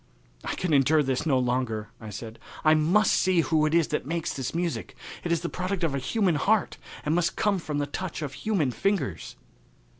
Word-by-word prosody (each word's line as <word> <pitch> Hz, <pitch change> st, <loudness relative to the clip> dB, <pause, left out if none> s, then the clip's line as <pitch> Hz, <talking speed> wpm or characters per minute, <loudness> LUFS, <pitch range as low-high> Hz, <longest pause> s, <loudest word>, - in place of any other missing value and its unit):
"I -, -, -3 dB
can 180 Hz, -4 st, -1 dB
endure 145 Hz, +2 st, +4 dB
this 135 Hz, +3 st, -1 dB
no 135 Hz, -4 st, +3 dB
longer," 120 Hz, -4 st, -1 dB
I 110 Hz, -, -7 dB
said. 110 Hz, +2 st, -8 dB, 0.3 s
"I 155 Hz, -, +7 dB
must 175 Hz, +7 st, +3 dB
see 185 Hz, -2 st, +3 dB
who 155 Hz, -1 st, +2 dB
it 155 Hz, -, +1 dB
is 170 Hz, -3 st, +3 dB
that -, -, -1 dB
makes 165 Hz, +3 st, -2 dB
that 135 Hz, +2 st, -4 dB
music. 170 Hz, -1 st, -2 dB, 0.3 s
It 175 Hz, -, -2 dB
is 170 Hz, -2 st, +1 dB
the 170 Hz, -, -2 dB
product 185 Hz, +1 st, -3 dB
of 160 Hz, -4 st, +1 dB
a 140 Hz, -, 0 dB
human 195 Hz, -, +1 dB
heart 210 Hz, +8 st, +1 dB, 0.3 s
and 150 Hz, -, +1 dB
must 175 Hz, +1 st, +1 dB
come 205 Hz, -2 st, +1 dB
from 150 Hz, -3 st, -4 dB
the 145 Hz, -, 0 dB
touch 160 Hz, +2 st, -5 dB
of 140 Hz, -2 st, -4 dB
human 180 Hz, -, 0 dB
fingers." 120 Hz, -, -2 dB
155 Hz, 210 wpm, -27 LUFS, 135-180 Hz, 0.3 s, I